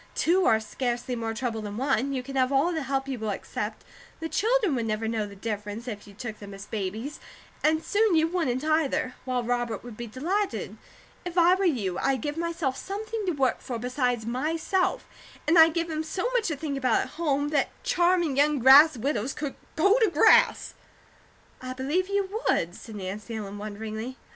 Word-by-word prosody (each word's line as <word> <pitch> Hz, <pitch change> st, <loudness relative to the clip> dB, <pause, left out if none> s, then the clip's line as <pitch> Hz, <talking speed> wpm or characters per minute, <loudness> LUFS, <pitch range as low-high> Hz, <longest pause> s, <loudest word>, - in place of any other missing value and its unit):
Two 360 Hz, +3 st, +3 dB
are 220 Hz, -, +4 dB
scarcely 245 Hz, +2 st, -3 dB
more 225 Hz, -1 st, -3 dB
trouble 225 Hz, -1 st, -2 dB
than 205 Hz, 0 st, -6 dB
one; 265 Hz, 0 st, +1 dB
you 260 Hz, -2 st, -2 dB
can 275 Hz, +1 st, -8 dB
have 260 Hz, 0 st, +2 dB
all 280 Hz, +6 st, +3 dB
the 320 Hz, -, -2 dB
help 270 Hz, 0 st, -2 dB
you 265 Hz, -3 st, -4 dB
will 220 Hz, -1 st, -3 dB
accept; 200 Hz, -, -4 dB, 0.4 s
the 325 Hz, -, -3 dB
children 440 Hz, -, +2 dB
would 235 Hz, -3 st, -1 dB
never 215 Hz, +1 st, -1 dB
know 220 Hz, -2 st, -1 dB
the 200 Hz, -, -11 dB
difference, 210 Hz, +2 st, -5 dB
if 210 Hz, -4 st, -6 dB
you 200 Hz, -, -14 dB
took 220 Hz, 0 st, -6 dB
them 200 Hz, -1 st, -9 dB
as 195 Hz, +1 st, -9 dB
babies, 220 Hz, +8 st, -4 dB, 0.4 s
and 315 Hz, +1 st, +2 dB
soon 420 Hz, -3 st, +3 dB
you 320 Hz, 0 st, +4 dB
wouldn't 300 Hz, -7 st, -1 dB
either; 310 Hz, -5 st, +1 dB
while 250 Hz, -2 st, -1 dB
Robert 240 Hz, -3 st, -2 dB
would 240 Hz, -2 st, -9 dB
be 235 Hz, +2 st, -6 dB
delighted. 370 Hz, -, -2 dB, 0.5 s
If 355 Hz, 0 st, -6 dB
I 350 Hz, +1 st, +6 dB
were 385 Hz, +1 st, +1 dB
you, 210 Hz, -, 0 dB
I'd 270 Hz, -1 st, +1 dB
give 295 Hz, -1 st, -3 dB
myself 330 Hz, -5 st, -2 dB
something 430 Hz, +1 st, -4 dB
to 355 Hz, -, +1 dB
work 270 Hz, -3 st, 0 dB
for 245 Hz, -, -4 dB
besides 245 Hz, -1 st, -1 dB
myself, 320 Hz, +9 st, 0 dB, 0.4 s
and 325 Hz, -, +4 dB
I'd 320 Hz, 0 st, +7 dB
give 335 Hz, 0 st, 0 dB
him 310 Hz, 0 st, -2 dB
so 365 Hz, +7 st, -2 dB
much 480 Hz, -3 st, +1 dB
to 320 Hz, -, -1 dB
think 285 Hz, -1 st, -3 dB
about 255 Hz, -4 st, +2 dB
at -, -, -8 dB
home, 290 Hz, -3 st, -1 dB
that 290 Hz, -2 st, +1 dB
charming 345 Hz, -4 st, +2 dB
young 295 Hz, +1 st, +4 dB
grass 275 Hz, +3 st, +8 dB
widows 250 Hz, 0 st, -1 dB
could 290 Hz, -2 st, -4 dB, 0.2 s
go 400 Hz, +9 st, +4 dB
to 445 Hz, -3 st, +4 dB
grass!" 315 Hz, -3 st, +4 dB, 0.9 s
"I 255 Hz, 0 st, -5 dB
believe 290 Hz, +9 st, -1 dB
you 400 Hz, +2 st, -1 dB
would," 170 Hz, +1 st, +1 dB
said 220 Hz, +3 st, -10 dB
Nancy 205 Hz, +4 st, -6 dB
Ellen, 205 Hz, -2 st, -6 dB
wonderingly. 220 Hz, +4 st, -6 dB
270 Hz, 195 wpm, -27 LUFS, 225-325 Hz, 0.9 s, grass